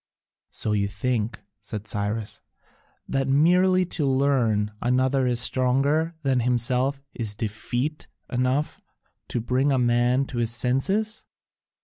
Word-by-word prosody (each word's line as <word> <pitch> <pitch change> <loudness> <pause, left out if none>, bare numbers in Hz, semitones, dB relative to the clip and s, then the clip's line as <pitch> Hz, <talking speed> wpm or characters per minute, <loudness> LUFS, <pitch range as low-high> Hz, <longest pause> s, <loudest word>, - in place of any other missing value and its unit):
"So 110 - -3
you 100 -1 +1
think," 110 +1 -2 0.2
said 105 0 -7
Cyrus, 105 0 -3 0.7
"that 135 -1 -1
merely 180 +6 +4
to 165 -3 -3
learn 130 -6 +2
another 130 +2 +2
is 120 -1 +1
stronger 140 +7 +1
than 135 -2 +2
himself 125 +3 +1
is 110 -3 -2
defeat 120 +7 -3 0.2
enough 130 +4 -1 0.5
to - - -2
bring 130 +5 +1
a 135 - +2
man 120 +2 +2
to 120 - -5
his 115 -1 0
senses?" 190 - 0
125 Hz, 120 wpm, -25 LUFS, 115-140 Hz, 0.7 s, merely